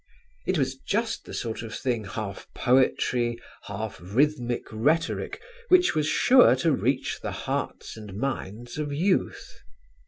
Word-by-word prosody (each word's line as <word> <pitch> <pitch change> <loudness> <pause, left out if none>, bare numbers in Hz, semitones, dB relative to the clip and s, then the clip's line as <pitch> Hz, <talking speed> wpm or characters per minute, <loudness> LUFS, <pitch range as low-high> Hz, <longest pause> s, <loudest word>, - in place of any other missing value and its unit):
It 185 - +2
was 135 -2 0
just 225 - -2
the - - -9
sort 115 -2 -3
of 115 -1 -6
thing, 120 -5 -1
half 100 0 -6
poetry, 125 -2 +2 0.3
half 105 -1 -5
rhythmic 120 - +1
rhetoric, 150 +10 0 0.3
which 360 -1 +5
was 155 -1 +1
sure 255 +9 +6
to 165 - +1
reach 130 +1 0
the - - -3
hearts - - -4
and 105 -3 -9
minds 120 0 -4
of 150 -1 -2
youth. 180 +7 -1
125 Hz, 135 wpm, -26 LUFS, 110-155 Hz, 0.3 s, sure